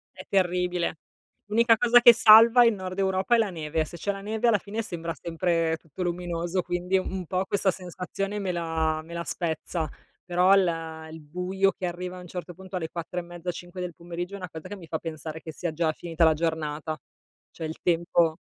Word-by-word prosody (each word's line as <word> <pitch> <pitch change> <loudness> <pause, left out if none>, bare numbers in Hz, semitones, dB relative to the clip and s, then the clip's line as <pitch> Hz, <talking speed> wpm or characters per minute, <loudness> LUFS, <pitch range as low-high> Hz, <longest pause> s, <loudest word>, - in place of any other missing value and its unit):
È - - -10
terribile. 180 -3 0 0.5
L'unica 230 +1 +5
cosa 245 0 +6
che 240 -1 +10
salva 230 +2 +8
il 230 - +5
nord 185 -1 -6
Europa 190 +4 +2
è - - +4
la 220 -3 +2
neve. 160 -2 -2
Se 170 - -10
c'è 200 +5 -1
la 195 0 -7
neve, 220 +3 -1
alla 215 -3 +5
fine, 210 +4 -4
sembra 170 -5 -5
sempre 165 -1 0
tutto 165 +4 -7
luminoso, 175 +1 -2
quindi, 175 +2 0
un 185 -1 -3
po', 185 +3 -1
questa 195 -1 +1
sensazione 190 +3 -5
me 190 -2 -1
la 160 -2 -1
me 170 +1 -11
la 170 0 -3
spezza. 165 -1 -2 0.4
Però, 180 +2 +4
il 165 -4 -1
il 160 0 -9
buio 180 +5 0
che 180 - -5
arriva, 180 +1 -4
a - - -8
un 180 - -11
certo 175 0 -7
punto, 190 +1 -10
alle 165 -3 -3
4 175 +1 -4
e - - -3
mezzo, 175 +1 -5
5 175 +2 -9
del 180 -2 -4
pomeriggio, 175 +2 -6
è - - -4
una 180 -3 -7
cosa 160 +3 -9
che 205 - -6
mi 170 -4 -12
fa 160 - -2
pensare 160 -1 -6
che 160 - -8
sia 170 +1 -3
già 160 0 +1
finita 165 0 0
la 160 - +6
giornata. 155 -1 -2 0.5
Cioè, 160 - -5
il 160 - -7
tempo. 170 -1 +2
175 Hz, 210 wpm, -26 LUFS, 165-190 Hz, 0.5 s, che